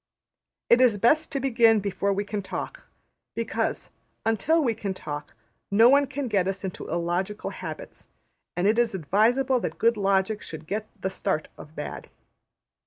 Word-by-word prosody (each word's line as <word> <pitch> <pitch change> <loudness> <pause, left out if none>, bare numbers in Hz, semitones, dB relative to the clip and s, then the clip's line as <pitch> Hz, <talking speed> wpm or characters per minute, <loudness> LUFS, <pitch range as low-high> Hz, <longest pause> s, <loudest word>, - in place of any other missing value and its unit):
It 240 +2 +5
is 240 -5 +5
best 300 +9 +3
to 275 - -1
begin 230 -4 +4
before 200 0 -1
we 200 +1 -1
can 205 0 -3
talk; - - -6 0.5
because, - - -2 0.3
until 225 +9 +2
we 235 -4 +1
can 200 -3 -4
talk, 145 -7 -7 0.3
no 225 +4 +6
one 280 +1 +5
can 270 0 -4
get 195 -5 +1
us 195 0 -3
into 190 -2 -6
illogical 175 +4 -2
habits; - - -8 0.5
and 180 - +1
it 215 +3 +3
is 235 -4 +1
advisable 235 - +2
that - - -4
good 230 0 +3
logic 195 +1 +1
should 160 -1 -8
get 215 +5 -3
the 190 0 -2
start 190 -4 -2
of 155 +1 -13
bad. 150 - -6
205 Hz, 165 wpm, -26 LUFS, 190-235 Hz, 0.5 s, no